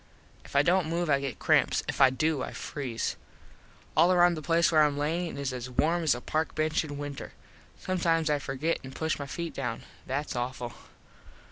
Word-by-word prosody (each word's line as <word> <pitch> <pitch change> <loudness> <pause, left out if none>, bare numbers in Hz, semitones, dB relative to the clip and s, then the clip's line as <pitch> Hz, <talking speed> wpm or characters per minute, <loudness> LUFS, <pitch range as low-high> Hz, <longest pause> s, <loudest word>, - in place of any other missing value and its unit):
If - - -14
I 140 - +6
dont 180 +1 +3
move 170 -1 0
I 140 - +4
get 140 -2 -4
cramps. - - +3
If - - -2
I 135 - +8
do, 145 +2 0
I - - -4
freeze. 130 -6 -4 0.8
All 165 +4 +5
around 175 -1 +5
the 155 - -5
place 170 +3 +3
where 155 -1 +6
Im 145 -1 +1
lyin 160 +2 -1
is 140 -2 -2
as 125 0 -5
warm 165 +7 +1
as 155 -6 +3
a 120 - -7
park 155 +4 -2
bench 155 +1 +1
in 145 -2 -6
winter. 145 -1 -6 0.4
Sometimes 165 -3 0
I 150 -1 +2
forget 140 +5 -1
and 130 0 -9
push 160 -1 -1
my 140 - -5
feet 170 +4 -4
down. 120 -4 -4 0.2
That's 140 +2 -2
awful. 120 -1 -3
150 Hz, 200 wpm, -29 LUFS, 135-165 Hz, 0.8 s, I